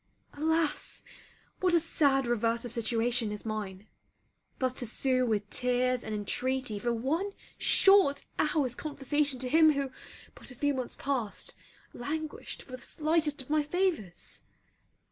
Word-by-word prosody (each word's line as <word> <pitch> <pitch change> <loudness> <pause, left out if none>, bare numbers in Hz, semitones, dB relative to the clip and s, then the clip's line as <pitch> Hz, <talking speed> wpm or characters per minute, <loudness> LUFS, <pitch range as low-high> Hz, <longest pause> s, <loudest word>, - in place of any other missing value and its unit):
Alas, 315 0 0 0.6
what 365 -2 +3
a - - +6
sad 285 -4 +2
reverse 235 0 0
of 240 - -5
situation 230 -1 +1
is 210 +1 -6
mine! 210 -3 -4 0.7
thus 255 -1 0
to 245 -2 -2
sue 255 +2 +1
with 210 -2 0
tears 250 0 +1
and 220 - -4
intreaty 250 +2 -1
for 240 +3 0
one 310 - -1 0.3
short 390 -8 +5
hour's 295 -5 +1
conversation 290 -1 -1
to 255 0 -3
him 315 +3 +6
who, 275 -2 -2 0.4
but - - -9
a 250 - -10
few 285 +3 +1
months 255 -2 -4
past, 255 -7 -3 0.4
languished 310 +4 -5
for - - -16
the 255 - -7
slightest 310 -2 0
of 255 - -21
my 305 0 +4
favours! 300 - -2
260 Hz, 145 wpm, -30 LUFS, 235-300 Hz, 0.7 s, a